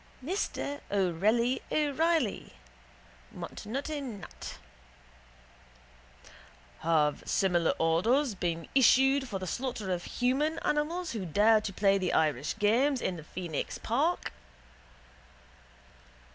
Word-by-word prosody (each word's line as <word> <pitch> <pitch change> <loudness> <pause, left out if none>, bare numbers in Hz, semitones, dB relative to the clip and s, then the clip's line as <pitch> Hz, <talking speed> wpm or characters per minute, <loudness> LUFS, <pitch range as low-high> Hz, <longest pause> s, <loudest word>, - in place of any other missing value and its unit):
Mr 290 -4 -3
Orelli 205 +6 +1
O'Reilly 305 -4 0 0.8
(Montenotte. 280 +7 -5
Nat.): 215 - -8 2.2
Have 150 -3 +1
similar 175 -4 +2
orders 225 - +2
been 170 -3 -3
issued 270 +1 +5
for 200 - -3
the 185 - -5
slaughter 225 -1 -3
of 175 -1 -4
human 280 +6 0
animals 315 +3 -1
who 215 -4 -4
dare 210 +6 +4
to 210 - -4
play 195 -1 +2
Irish 150 -3 +1
games 250 +7 +2
in 185 - -2
the 160 - -9
Phoenix 165 -2 -4
park? 295 +10 0
220 Hz, 95 wpm, -30 LUFS, 180-280 Hz, 2.2 s, issued